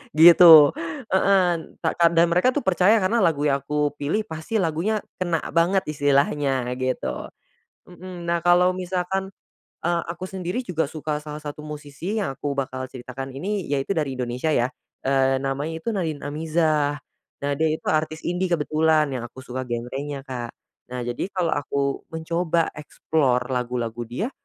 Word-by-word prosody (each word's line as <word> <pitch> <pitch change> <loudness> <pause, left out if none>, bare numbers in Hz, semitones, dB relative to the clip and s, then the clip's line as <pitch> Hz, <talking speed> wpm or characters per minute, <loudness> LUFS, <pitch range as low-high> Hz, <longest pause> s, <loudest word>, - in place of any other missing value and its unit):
gitu. 165 -2 +9 0.4
Heeh, 190 -3 +3
n - - -14
tak - - -1
ka 170 - +7
dan 170 0 +4
mereka 215 +9 +3
tuh 290 - 0
percaya 190 +3 +4
karena 230 +5 +2
lagu 160 -7 +2
yang 140 -2 +2
aku 150 +1 -1
pilih 160 +10 0
pasti 160 +6 -6
lagunya 190 +3 0 0.2
kena 175 -3 0
banget 175 +4 +2
istilahnya 140 -2 +1 0.2
gitu. 130 0 -2 0.6
Mmm. 180 0 -9
Nah, 170 0 0
kalau 180 +1 +5
misalkan, 185 +1 -3 0.5
eee, 170 0 0
aku 180 +2 -7
sendiri 185 +4 -3
juga 165 - -2
suka 150 -1 -3
salah 150 0 -7
satu 150 0 -7
musisi 150 +7 -5
yang 160 -10 -2
aku 145 +2 -3
bakal 130 -2 -3
ceritakan 130 +1 -7
ini 190 +9 -3
yaitu 140 +7 0
dari 150 -4 0
Indonesia 125 +5 -1
ya. 120 -3 +2 0.4
Eee, 135 -1 +3
namanya 140 +4 -2
itu 230 - -17
Nadin 160 -6 -2
Amizah. 155 -1 0 0.4
Nah, 145 - 0
dia 160 - +3
itu - - -13
artis 155 0 -1
indie 180 +2 -1
kebetulan 160 -1 +2
yang 125 -3 -3
aku 130 +2 -13
suka 130 +1 -5
genrenya, 135 +4 -4
Kak. 125 -3 -6 0.3
Nah 125 0 -5
jadi 120 +7 -3
kalau 185 -4 -1
aku 140 -1 -2
mencoba 165 +1 0
explore 140 -4 0
lagu-lagu 120 -2 -2
dia 200 - -3
155 Hz, 160 wpm, -24 LUFS, 140-175 Hz, 0.6 s, gitu